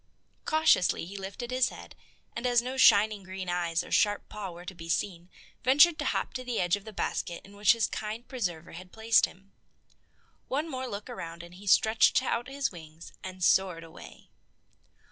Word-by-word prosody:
Cautiously 310 Hz, -, +3 dB
he 190 Hz, +4 st, -10 dB
lifted 200 Hz, +5 st, -6 dB
his 255 Hz, 0 st, +2 dB
head, -, -, -11 dB, 0.4 s
and 235 Hz, +2 st, -2 dB
as 245 Hz, -1 st, +4 dB
no 250 Hz, +2 st, -4 dB
shining 215 Hz, -4 st, +5 dB
green 190 Hz, 0 st, -7 dB
eyes 175 Hz, -1 st, 0 dB
or -, -, -12 dB
sharp 205 Hz, -1 st, +2 dB
paw 210 Hz, -2 st, -6 dB
were 175 Hz, 0 st, -11 dB
to 190 Hz, -, -7 dB
be 165 Hz, -2 st, -10 dB
seen, 170 Hz, +1 st, -2 dB, 0.3 s
ventured 295 Hz, +6 st, +6 dB
to -, -, -2 dB
hop -, -, -1 dB
to 255 Hz, -, -5 dB
the 245 Hz, -2 st, -2 dB
edge 175 Hz, +1 st, +2 dB
of 205 Hz, 0 st, -10 dB
the 220 Hz, -, -8 dB
basket 175 Hz, -3 st, -3 dB
in 200 Hz, +1 st, -15 dB
which 205 Hz, +2 st, +5 dB
his 230 Hz, -1 st, +1 dB
kind 220 Hz, +3 st, -5 dB
preserver 180 Hz, -, -4 dB
had 180 Hz, +2 st, -11 dB
placed 225 Hz, 0 st, +3 dB
him. 195 Hz, +2 st, -19 dB, 1.0 s
One 295 Hz, +5 st, -1 dB
more 260 Hz, -4 st, -4 dB
look 205 Hz, -3 st, -6 dB
around 170 Hz, -9 st, -7 dB
and 170 Hz, 0 st, -13 dB
he 195 Hz, +3 st, -13 dB
stretched 220 Hz, +3 st, +4 dB
out 240 Hz, +1 st, -1 dB
his 275 Hz, 0 st, -2 dB
wings 160 Hz, -2 st, -12 dB
and 185 Hz, -1 st, -7 dB
soared 180 Hz, -3 st, +3 dB
away. 165 Hz, -, -14 dB
200 Hz, 190 wpm, -29 LUFS, 175-240 Hz, 1.0 s, ventured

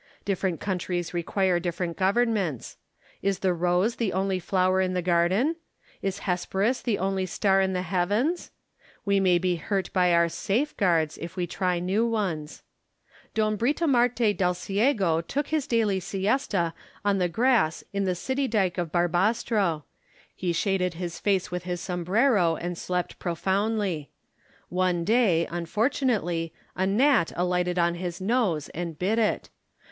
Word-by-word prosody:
Different 190 Hz, -4 st, -1 dB
countries 180 Hz, -3 st, -3 dB
require 180 Hz, +1 st, +1 dB
different 175 Hz, -1 st, -3 dB
governments. 195 Hz, -, 0 dB, 0.5 s
Is 195 Hz, -1 st, 0 dB
the 185 Hz, -1 st, +1 dB
rose 180 Hz, +6 st, +1 dB
the 220 Hz, -6 st, -1 dB
only 190 Hz, 0 st, 0 dB
flower 185 Hz, +1 st, +1 dB
in 185 Hz, -1 st, 0 dB
the 180 Hz, -, +1 dB
garden? 185 Hz, -, +2 dB, 0.4 s
Is 195 Hz, 0 st, -3 dB
Hesperus 195 Hz, +6 st, 0 dB
the 225 Hz, -5 st, 0 dB
only 190 Hz, 0 st, -1 dB
star 195 Hz, +1 st, +2 dB
in 190 Hz, 0 st, +1 dB
the 180 Hz, 0 st, -1 dB
heavens? 205 Hz, -, 0 dB, 0.6 s
We 200 Hz, -1 st, +3 dB
may 185 Hz, -2 st, +4 dB
be 175 Hz, -1 st, 0 dB
£urt 195 Hz, -2 st, -1 dB
by 180 Hz, -2 st, +3 dB
our 170 Hz, 0 st, +4 dB
safeguards, 185 Hz, -, 0 dB
if 170 Hz, +2 st, -7 dB
we 180 Hz, -2 st, -1 dB
try 180 Hz, 0 st, -1 dB
new 185 Hz, +6 st, 0 dB
ones. 190 Hz, -10 st, -2 dB, 0.7 s
Don 215 Hz, -1 st, +1 dB
Britomarte 245 Hz, -5 st, +2 dB
Delciego 190 Hz, -, +1 dB
took 285 Hz, +2 st, -2 dB
his 310 Hz, -2 st, 0 dB
daily 220 Hz, -6 st, +1 dB
siesta 195 Hz, -2 st, 0 dB, 0.3 s
on 200 Hz, -1 st, +2 dB
the 180 Hz, -1 st, +1 dB
grass 225 Hz, -5 st, +2 dB
in 200 Hz, 0 st, 0 dB
the 185 Hz, -1 st, 0 dB
city 265 Hz, +8 st, -1 dB
dyke 190 Hz, -6 st, 0 dB
of 170 Hz, -3 st, -2 dB
Barbastro: 175 Hz, 0 st, +1 dB, 0.5 s
he 180 Hz, -2 st, -1 dB
shaded 180 Hz, 0 st, 0 dB
his 175 Hz, 0 st, -5 dB
face 195 Hz, -4 st, 0 dB
with 180 Hz, 0 st, -4 dB
his 180 Hz, -1 st, -3 dB
sombrero, 180 Hz, +1 st, +2 dB
and 175 Hz, +2 st, -4 dB
slept 180 Hz, +1 st, -3 dB
profoundly. 190 Hz, -1 st, -1 dB, 0.6 s
One 180 Hz, -1 st, +1 dB
day, 195 Hz, -5 st, +3 dB
unfortunately, 175 Hz, -, -1 dB, 0.2 s
a 190 Hz, +1 st, 0 dB
gnat 245 Hz, -, +3 dB
alighted 180 Hz, 0 st, 0 dB
on 170 Hz, -1 st, +2 dB
his 175 Hz, 0 st, -5 dB
nose 195 Hz, -, 0 dB
and 170 Hz, -2 st, -5 dB
bit 200 Hz, +7 st, +1 dB
it. 220 Hz, -, 0 dB
185 Hz, 145 wpm, -26 LUFS, 175-210 Hz, 0.7 s, may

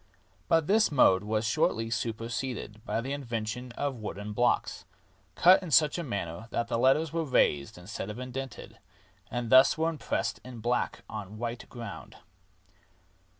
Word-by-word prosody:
But 165 Hz, +6 st, +3 dB
this 215 Hz, +3 st, +3 dB
mode 95 Hz, -9 st, +5 dB
was 110 Hz, +1 st, -1 dB
shortly 115 Hz, +1 st, +1 dB
super 115 Hz, +1 st, -2 dB
seded 115 Hz, -3 st, -5 dB
by 115 Hz, -, -1 dB
the 135 Hz, +4 st, -4 dB
invention 120 Hz, -2 st, -4 dB
of 140 Hz, 0 st, -2 dB
wooden 105 Hz, -1 st, -6 dB
blocks, 120 Hz, +3 st, +1 dB, 0.5 s
cut 185 Hz, +2 st, +6 dB
in 180 Hz, -, -6 dB
such 155 Hz, +2 st, +4 dB
a -, -, -2 dB
manner 100 Hz, -, -4 dB
that 115 Hz, 0 st, -2 dB
the 115 Hz, -, 0 dB
letters 145 Hz, +5 st, +3 dB
were 165 Hz, -1 st, 0 dB
raised 75 Hz, -, +1 dB
instead 95 Hz, +3 st, -6 dB
of 105 Hz, -, -6 dB
indented, 130 Hz, 0 st, -7 dB, 0.5 s
and 120 Hz, -2 st, -3 dB
thus 130 Hz, +3 st, +7 dB
were 160 Hz, +1 st, +1 dB
impressed 155 Hz, -, -2 dB
in 125 Hz, -1 st, -9 dB
black 120 Hz, +2 st, -1 dB
on 105 Hz, -3 st, -6 dB
a -, -, -17 dB
white 115 Hz, +3 st, -6 dB
ground. 120 Hz, -1 st, -9 dB
120 Hz, 160 wpm, -29 LUFS, 110-135 Hz, 0.5 s, thus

